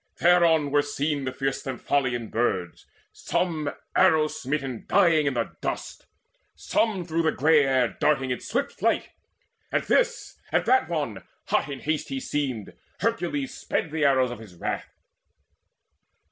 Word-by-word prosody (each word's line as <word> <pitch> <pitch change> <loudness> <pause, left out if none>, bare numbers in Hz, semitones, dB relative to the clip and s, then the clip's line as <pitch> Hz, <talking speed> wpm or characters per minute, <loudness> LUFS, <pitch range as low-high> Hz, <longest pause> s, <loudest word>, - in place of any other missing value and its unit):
Thereon 165 -4 +4
were 145 0 +4
seen 145 0 -2
the 130 - -2
fierce 135 +1 -2
Stymphalian 130 -3 -1
Birds, 95 -7 -1 0.3
Some 160 -5 -1 0.3
arrow 155 -1 +5
smitten 135 -4 -4
dying 160 -4 +4
in 140 - 0
the 115 -1 -2
dust, - - -5 0.5
Some 205 -6 0
through 165 0 0
the 160 -1 +2
grey 150 +1 +4
air 130 -3 +2
darting 135 -4 +2
in 125 - -1
swift 275 +4 -2
flight. - - +1 0.6
At - - 0
this, - - 0
at - - +2
that 390 0 +3
one - - -2 0.3
hot - - +1
in 135 -2 -6
haste 155 0 -2
he 270 - -2
seemed 140 - -3 0.3
Hercules 175 - -1
sped 155 - -2
the 155 -1 -1
arrows 130 -3 +3
of 120 - -7
his 105 -6 -13
wrath. - - -4
145 Hz, 145 wpm, -26 LUFS, 130-160 Hz, 0.6 s, arrow